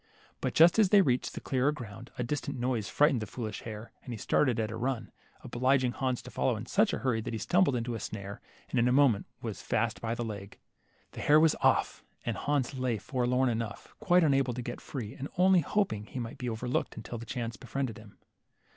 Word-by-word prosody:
But - - -2
just 170 +6 +7
as 210 -4 +5
they 200 0 +7
reached 125 -5 -1
clearer 135 +2 +2
ground, 115 -4 -8
a 125 - -1
distant 140 +2 -3
noise 120 -5 -1
fright 150 +1 +4
ened 125 - 0
the 110 - -4
foolish 110 -1 -5
hare, 110 0 -8
and 125 - -9
he 115 - -4
started 120 +3 +2
at 110 -1 -1
a - - -4
run, 120 -1 -2 0.3
obliging 130 +1 +2
Hans 130 +1 -2
to 125 - -10
follow 125 - +1
in 110 +2 -6
such 205 - +2
a - - -1
hurry 120 -4 0
that 115 0 -4
he - - -2
stumbled 175 - +2
into 120 0 -2
a 115 - -3
snare, 100 0 -6 0.3
and - - +2
in 120 - +4
a - - +3
moment 130 -6 +4 0.2
was - - -4
fast - - -1
by 115 0 -1
the 120 -1 -3
leg. 100 -3 -7 0.5
The - - -7
hare 150 +1 +6
was 160 -1 +5
off, - - +2 0.2
and 115 - -1
Hans 140 +2 0
lay 130 -2 -1
there - - -5
forlorn 125 +3 +1
enough, 115 -1 -4
quite 180 -5 +4
unable 135 -5 +2
to 125 - -4
get 120 0 -6
free, 115 -6 -6
and 140 - -6
only 185 0 +6
hoping 145 - 0
he - - -8
might 115 -2 -5
be 125 - -2
overlooked 115 +2 -2
until 115 +1 -6
chance 115 0 -4
befriended 125 -2 -4
him. 105 -2 -15
125 Hz, 225 wpm, -30 LUFS, 115-140 Hz, 0.5 s, just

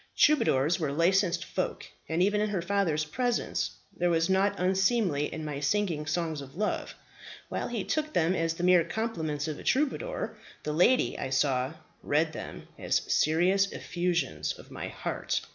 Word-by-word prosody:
Troubadours 170 - +4
were 155 -4 -1
licensed 175 +2 +2
folk, 185 - -3 0.2
and 165 +2 +2
even 205 +2 +2
in 215 - +1
her 195 -4 -1
father's 175 -5 +1
presence 245 +9 -1 0.3
there 175 0 +1
was 165 +1 +2
nought 200 +2 +3
unseemly 185 -4 +2
in 155 -1 -5
my 145 -2 -4
singing 160 -1 0
songs 160 -2 -1
of 135 -1 -11
love. 210 +3 -2 0.5
While - - -2
he 230 -5 -3
took 310 +6 -1
them 170 +1 +2
as 165 -2 0
the 175 - -5
mere 180 -1 +6
compliments 160 -10 -2
of 155 -2 -4
a - - -9
troubadour, 300 - 0 0.3
the 150 - -2
lady, 180 +11 +3
I - - -3
saw, 130 0 +1 0.3
read 155 +2 +1
them - - -8
as - - +1
serious 185 +6 +3
effusions 170 - -1
of - - -14
my - - -5
heart. - - -3
175 Hz, 165 wpm, -29 LUFS, 155-200 Hz, 0.5 s, mere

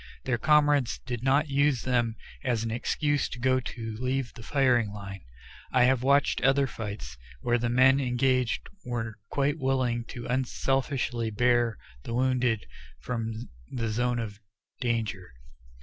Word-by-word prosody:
Their 120 -2 0
comrades 145 -3 +3
did 120 -2 -3
not 140 +4 +2
use 140 -2 +2
them 120 -3 +1 0.3
as 120 -3 0
an 115 - -2
excuse 145 +4 0
to - - -7
go 130 +1 +2
to 115 -3 -6
leave 130 0 -1
the 120 - -11
firing 125 -3 +2
line. 100 -2 -8 0.5
I 125 -1 +4
have 130 0 +3
watched 140 +2 +3
other 135 +2 +4
fights, 100 - -6 0.2
where 120 0 +2
the 120 0 0
men 130 +3 +5
engaged 125 -1 +1 0.2
were 115 -3 -4
quite 145 +2 0
willing 130 -3 0
to 120 -2 -8
unselfishly 130 -2 0
bear 120 0 +2 0.2
the 115 - -5
wounded 125 -3 +1 0.3
from 115 -1 -4 0.2
the 115 -3 -2
zone 120 +2 0
of 105 -3 -5 0.4
danger. 110 - -2
125 Hz, 145 wpm, -28 LUFS, 115-135 Hz, 0.5 s, men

